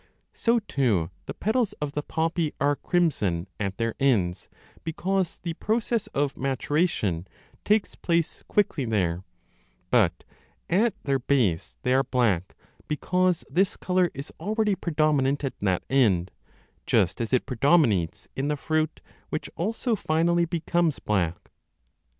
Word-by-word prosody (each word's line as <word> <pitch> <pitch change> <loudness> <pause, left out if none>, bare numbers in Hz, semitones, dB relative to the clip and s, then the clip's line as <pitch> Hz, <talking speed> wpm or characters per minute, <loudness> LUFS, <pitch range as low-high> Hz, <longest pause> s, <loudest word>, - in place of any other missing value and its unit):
So, 235 0 +2
too, 120 - 0
30 - - -33
the - - -4
petals 220 +1 0
of 150 -1 -4
the 150 - -2
poppy 160 +1 -1
are 145 0 +2
crimson 105 - 0
at 100 -2 -2
their 115 -1 -1
ends, 100 -10 +1 0.3
because 185 +2 -1
the 170 -2 -4
process 225 +4 -1
of 140 0 -1
maturation 135 - 0 0.4
takes 210 0 +2
place 170 -2 -1
quickly 175 -9 +1
there, 95 -6 0 0.7
but - - +3 0.5
at 210 +4 +3
their 135 -1 +1
base 120 -11 0
they 125 -1 +2
are 135 - +5
black, 105 -10 0 0.3
because 180 +3 +1
this 190 +2 +1
colour 180 -1 +2
is 140 +3 -7
already 210 +4 +1
predominant 150 -5 +1
at 135 - -3
that 95 -3 0
end; 95 -10 +3 0.6
just - - +2
as 115 - -2
it 130 - +2
predominates 125 - +2
in 135 +2 -1
the 150 - +1
7g6 - - -11
b - - -22
fruit, 155 0 0 0.3
which 155 - -3
also 225 +5 -1
finally 170 -1 +2
becomes 170 -2 0
black. 90 -5 -1
145 Hz, 140 wpm, -26 LUFS, 115-175 Hz, 0.7 s, are